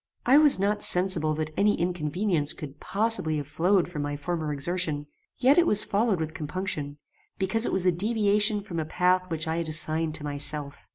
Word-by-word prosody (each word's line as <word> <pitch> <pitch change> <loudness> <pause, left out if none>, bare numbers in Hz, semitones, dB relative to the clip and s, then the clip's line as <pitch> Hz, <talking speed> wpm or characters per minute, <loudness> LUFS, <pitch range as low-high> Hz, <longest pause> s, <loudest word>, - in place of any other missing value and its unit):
"I 270 +4 +6
was 300 -2 +6
not 205 +2 -1
sensible 175 -4 +1
that 155 0 -3
any 205 +1 +1
inconvenience 170 -1 -1
could 145 -1 -10
possibly 200 -7 -1
have 145 -2 -5
flowed 175 +5 +1
from 170 -4 -6
my 145 0 -4
former 160 0 -3
exertion; 150 0 -1 0.3
yet 275 +6 +4
it 345 - +3
was 210 0 +7
followed 205 -2 0
with 160 0 -4
compunction, 155 -2 -4 0.4
because 205 +4 +2
it - - -2
was 185 -1 0
a 180 - +4
deviation 210 +2 +2
from 180 -5 -6
a - - -1
path 185 +3 +1
which 160 -1 -4
I 160 +1 -2
had 165 -1 -3
assigned 155 0 0
to 160 - -1
myself. 145 0 -5
175 Hz, 190 wpm, -26 LUFS, 155-200 Hz, 0.4 s, was